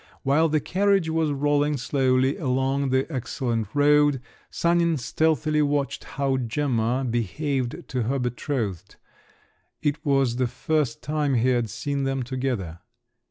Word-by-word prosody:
While 150 +4 +3
the 155 0 +2
carriage 195 0 +1
was 160 -1 +1
rolling 145 +1 +1
slowly 130 0 +1
along 135 0 0
an 130 +1 +2
excellent 120 -5 -2
road, 145 -1 +4 0.3
Sanin 170 -1 +1
stealthily 155 +3 +1
watched 145 -2 -1
how 135 -1 -1
Gemma 125 0 0
behaved 120 - -2
to 125 - -1
her 125 +5 0
betrothed; 120 - -3 0.9
it 150 +1 -1
was 135 -5 +2
the 125 -1 +1
first 135 +1 -1
time 150 -2 0
he 120 +2 +2
had 120 -3 +1
seen 140 +6 -3
them 135 -1 -1
together. 120 -10 -3
135 Hz, 130 wpm, -25 LUFS, 125-150 Hz, 0.9 s, road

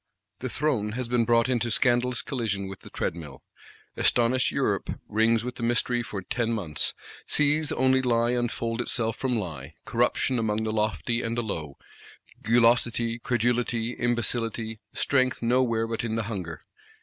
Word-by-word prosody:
The 130 - -3
Throne 120 -7 0
has 125 0 -3
been 120 -1 +2
brought 115 0 +4
into 120 -2 0
scandalous 120 0 +1
collision 105 -7 -2
with 95 0 -8
the - - -13
Treadmill. 80 -4 -5 0.5
Astonished 125 +2 +2
Europe - - -1
rings 110 +1 +2
with 125 0 -5
the - - -7
mystery 120 +1 +1
for 100 -5 -6
ten 120 +2 -1
months; 85 -9 -2 0.3
sees 150 +1 +3
only 130 0 +3
lie 120 -1 +2
unfold 120 -1 -1
itself 115 -2 -1
from 130 -2 -1
lie; 80 -7 -6
corruption 120 +1 +1
among 110 -1 0
the 110 0 -1
lofty 110 +1 0
and 115 0 -3
the 120 - 0
low, 80 -9 -5 0.6
gulosity, 115 0 +3
credulity, 120 -1 0
imbecility, 115 -2 0
strength 130 -3 +1
nowhere 115 -2 +2
but 115 0 -3
in 110 -1 -2
the 115 - 0
hunger. 95 -7 -5
115 Hz, 150 wpm, -27 LUFS, 110-120 Hz, 0.6 s, brought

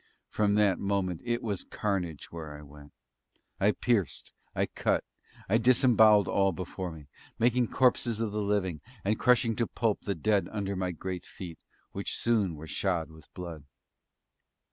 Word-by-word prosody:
From 105 -1 +2
that 105 -3 +3
moment 95 -4 -1
it 120 0 -1
was 105 -5 -2
carnage 90 -7 -3
where 80 -3 -7
I 75 - -12
went. 75 0 -14 0.7
I 100 +2 +4
pierced. 105 - -1 0.2
I - - +2
cut. - - 0 0.4
I 110 +4 +3
disembowelled 115 -4 +5
all 95 -1 +2
before 90 +1 -5
me 75 -3 -11 0.3
making 120 +1 +3
corpses 120 -3 +2
of 115 -2 -1
the 105 +1 -2
living, 100 -6 0 0.2
and 105 +2 +1
crushing 125 -2 +3
to 115 - +1
pulp 115 -3 0
the 100 - -2
dead 100 +5 +1
under 100 -2 -2
my 90 -1 -1
great 90 +1 -5
feet, 85 -4 -9 0.3
which - - -3
soon 105 -8 +1
were 75 +1 -9
shod 85 -1 -1
with 80 -2 -16
blood. 85 -5 -7
100 Hz, 160 wpm, -29 LUFS, 85-110 Hz, 0.7 s, disembowelled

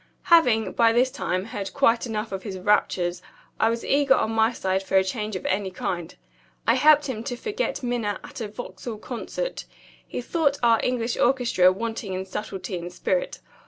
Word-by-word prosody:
Having, 245 -10 +5
by 230 -1 +4
this 250 +3 +3
time, 185 -4 -2
heard 205 -3 -6
quite 230 +2 +3
enough 220 -1 -3
of 195 -1 -4
his 195 -3 -6
raptures, 180 -2 +1 0.4
I 225 - +4
was 230 0 -2
eager 280 -1 +4
on 220 - 0
my 225 +1 +3
side 190 -4 -1
for 195 0 -3
a 190 - +5
change 210 +2 -3
of 185 - -5
any 195 0 0
kind. 175 -2 -4 0.5
I - - +5
helped 300 -1 +5
him 230 -5 -4
to 245 - -3
forget 430 - -3
Minna 235 -5 -1
at - - -9
a 220 - -2
Vauxhall 215 0 -7
Concert. 255 - -5 0.4
He - - -5
thought 285 +2 0
our 230 -1 +5
English 240 -1 -1
orchestra 240 -8 +4
wanting 225 0 -4
in 185 +1 -3
subtlety 190 -2 -5
and 175 +1 -7
spirit. - - -2
225 Hz, 185 wpm, -25 LUFS, 190-245 Hz, 0.5 s, Having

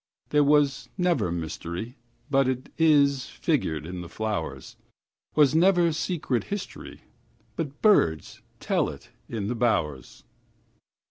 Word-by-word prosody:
There 150 0 +4
was 140 -3 +2
never 175 - +1
mysteryBut 120 - -3
'tis 140 -4 +3
figured 80 -1 -1
in 90 +1 -6
the 85 - -9
flowers; 80 -11 -4 0.6
SWas 150 -2 +5
never 175 0 +4
secret 150 -7 -2
historyBut 205 -1 -7 0.8
birds 85 - +3 0.2
tell - - 0
it - - -11 0.2
in 110 -4 -3
the 115 - -1
bowers. 85 - -1
125 Hz, 105 wpm, -26 LUFS, -, 0.8 s, SWas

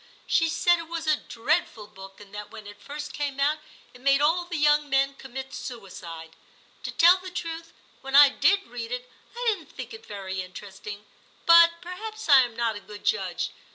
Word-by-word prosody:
She 325 0 +2
said 345 +1 +3
it 330 - -7
was 330 0 -5
a 310 -1 +4
dreadful 235 -4 -2
book, 195 -1 -13
and 205 -1 -15
that 210 0 -7
when 215 - -11
it 205 0 -12
first 295 +1 -7
came 285 -2 -3
out 295 +2 +2 0.3
it 245 - -16
made 275 +1 +4
all 330 +4 +2
the 345 -1 -4
young 295 0 +3
men 275 0 +2
commit 265 0 -8
suicide. 175 -9 -8 0.5
To - - -5
tell 350 +2 +6
the 370 0 -8
truth, 330 -2 -6 0.3
when 270 0 -3
I 285 0 +10
did 395 +7 +2
read 235 -1 -7
it, 250 0 -4 0.3
I 485 +1 -4
didn't 390 -7 -3
think - - -8
it 450 0 -11
very 190 -2 -5
interesting, 200 +2 -9 0.4
but 335 0 +7
perhaps 435 +4 -7
I 280 -3 +8
am 240 -3 -2
not 230 -1 0
a - - -6
good 205 0 -12
judge. - - -1
275 Hz, 195 wpm, -26 LUFS, 215-335 Hz, 0.5 s, I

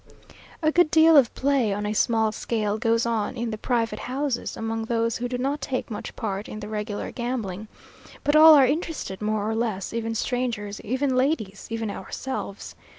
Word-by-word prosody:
A 310 - +4
good 350 -1 +4
deal 320 +1 +6
of 265 -5 +6
play 270 -5 +1
on 205 +1 -2
a 210 - -1
small 220 0 +2
scale 215 -1 -2
goes 230 +1 +2
on 230 +1 -1
in 235 0 -2
the 215 - -4
private 230 -3 -1
houses, 265 -1 -3
among 225 0 -3
those 230 0 0
who 245 0 -3
do 250 - -2
not 275 +3 -1
take 255 -2 -3
much 210 - -6
part 200 -1 -4
in 215 - -6
the 210 - -7
regular 210 -1 -4
gambling; 225 -5 -4 0.6
but 290 - +2
all 315 0 +10
are 275 -2 +7
interested 290 - -3
more 210 0 -1
or 220 - 0
less; 220 -4 -2
even 225 0 -2
strangers, 225 -4 -2
even 260 +4 0
ladies, 255 -7 -1
even 225 -2 -3
ourselves. 205 -3 -6
230 Hz, 185 wpm, -25 LUFS, 215-260 Hz, 0.6 s, all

